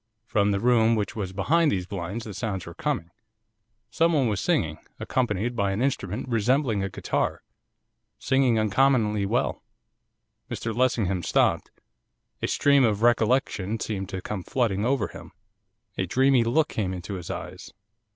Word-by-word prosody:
From 105 -2 +1
the 100 -1 +1
room 115 0 +4
which 105 -2 -2
was 100 -4 -3
behind 150 - +2
these 90 -2 -1
blinds 100 +4 -5
the 105 - -7
sounds 95 -4 -3
were 85 - -9
coming. 85 +1 -3 0.8
Someone 160 -6 +2
was 105 -3 -1
singing, 80 - 0 0.2
accompanied 120 -1 -1
by 100 -3 0
an 100 - -2
instrument 120 -4 -2
resembling 120 -2 +1
a 95 - -2
guitar, - - -2 0.7
singing 130 -3 +2
uncommonly 110 -2 +2
well.' - - -1 0.9
Mr 115 -1 -4
Lessingham 110 -7 +1
stopped. - - +1 0.7
A - - 0
stream 140 -1 +4
of 110 -2 +1
recollection 115 -3 +2
seemed 95 -4 -4
to 95 -1 -5
come 105 -3 -4
flooding 105 -1 0
over 135 +2 +1
him. 85 +1 -12 0.7
A 95 - 0
dreamy 130 +4 +3
look 135 +7 +2
came 95 -4 -2
into 90 +3 -6
his 90 -3 -6
eyes. - - -7
110 Hz, 150 wpm, -26 LUFS, 95-125 Hz, 0.9 s, room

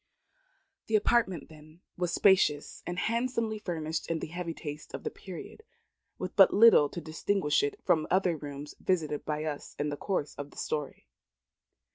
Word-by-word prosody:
The 220 - +1
apartment, 210 -6 +2
then, 155 +2 -16
was 175 -1 -1
spacious 165 -7 +3
and 175 0 -3
handsomely 230 0 -1
furnished 160 -4 -3
in 165 - 0
the - - -4
heavy 175 -2 -4
taste 150 -2 -7
of - - -8
the - - -3
period, 185 - -9 0.6
with 185 0 -5
but 195 -1 +8
little 205 -9 +7
to - - -6
distinguish 165 +1 0
it 425 -1 -2
from 155 -2 +2
other 185 -2 +2
rooms 145 -1 -7
visited 155 -5 -1
by 150 0 -2
us 150 -2 -5
in 145 +1 -1
the 145 - -4
course 180 -6 -2
of 145 0 -5
this - - -7
story. 150 -3 -4
170 Hz, 165 wpm, -30 LUFS, 150-195 Hz, 0.6 s, but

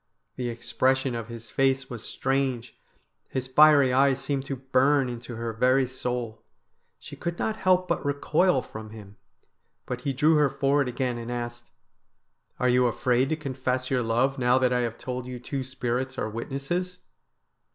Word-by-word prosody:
The 125 -1 -3
expression 130 +2 0
of 115 -1 -4
his 115 -1 -10
face 135 0 +1
was 120 -3 -7
strange, 130 -3 -1 0.5
his 130 -1 -3
fiery 140 0 +6
eyes 135 0 +4
seemed 135 -1 -2
to 135 - -2
burn 135 +1 +2
into 120 0 -7
her 115 0 -4
very 130 +4 +3
soul. 125 -3 -4 0.6
She - - -11
could 170 0 -4
not 220 - -1
help 185 0 +2
but 170 - -1
recoil 145 +1 +2
from 110 0 -9
him, 105 -2 -12 0.7
but 125 0 -4
he 140 - -1
drew 150 +4 +3
her 145 -2 +4
forward 140 +1 +1
again 125 -1 -2
and 115 +1 -6
asked: 120 0 -5 0.5
' - - -46
Are 125 - +2
you 125 0 +4
afraid 125 +2 +1
to 160 - +1
confess 130 -3 -3
your 130 -2 +2
love 120 +4 +1
now 125 0 +4
that 130 -1 +2
I 125 - +2
have 115 -1 -2
told 125 -1 -5
you 125 -1 -6
two 135 +2 -4
spirits 130 0 -3
are - - -1
witnesses 140 +10 -3
130 Hz, 170 wpm, -26 LUFS, 120-135 Hz, 0.7 s, fiery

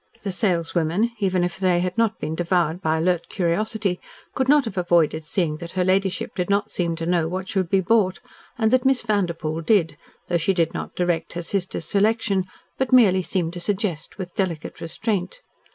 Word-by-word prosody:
The 200 - -2
saleswomen, 180 +2 0
even 185 -3 +1
if 175 +1 -3
they 185 -2 +3
had 180 0 -2
not 225 -1 +1
been 155 - -4
devoured 175 0 0
by 160 -2 +1
alert 175 +1 0
curiosity, 195 +1 -1 0.3
could 260 0 0
not 290 -2 +5
have 225 - -5
avoided 170 -3 +2
seeing 160 -2 -1
that 170 +1 -8
her 185 -1 +1
ladyship 190 0 0
did 180 -1 -2
not 205 +1 +1
seem 170 -2 -1
to 165 0 -4
know 170 -2 +1
what 185 +2 -4
should 185 -4 -1
be 195 0 +3
bought, 195 -1 +2 0.4
and 220 -1 +2
that 255 -1 +4
Miss 265 -3 +2
Vanderpoel 170 -7 -1
did, 165 -5 +2 0.3
though 175 - +1
she 190 +4 +1
did 165 -2 +1
not - - -6
direct 175 -2 -1
her 175 0 -4
sister's 190 +1 -2
selection, 205 -2 +1 0.3
but 265 -1 0
merely 205 -7 +6
seemed 175 -2 -2
to 175 - -6
suggest 185 -3 -3
with 180 -3 -6
delicate 175 -5 -3
restraint. 195 - -3
180 Hz, 190 wpm, -23 LUFS, 170-205 Hz, 0.4 s, merely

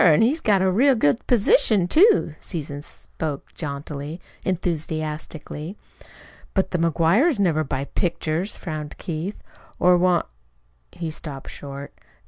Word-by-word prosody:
An' 165 +3 +6
he's 290 +8 +2
got 200 -4 +3
a 190 - +3
real 260 +8 +4
good 220 -1 +1
position, 220 - +4
too." 380 - +5
Susan 145 -3 -5
spoke 150 0 -6
jauntily, 145 +1 -5 0.2
enthusiastically. 160 -1 -3 0.8
"But 190 - +1
the 180 - 0
McGuires 170 - +3
never 165 -5 +2
buy 135 -1 -3
pictures," 170 +3 -1
frowned 155 -4 -6
Keith, 170 +4 -5 0.3
"or 180 0 +5
want 180 -1 +3 0.4
" - - -41 0.3
He 165 -2 -5
stopped 145 -3 -7
short. 140 0 -8
170 Hz, 125 wpm, -23 LUFS, 150-195 Hz, 0.8 s, An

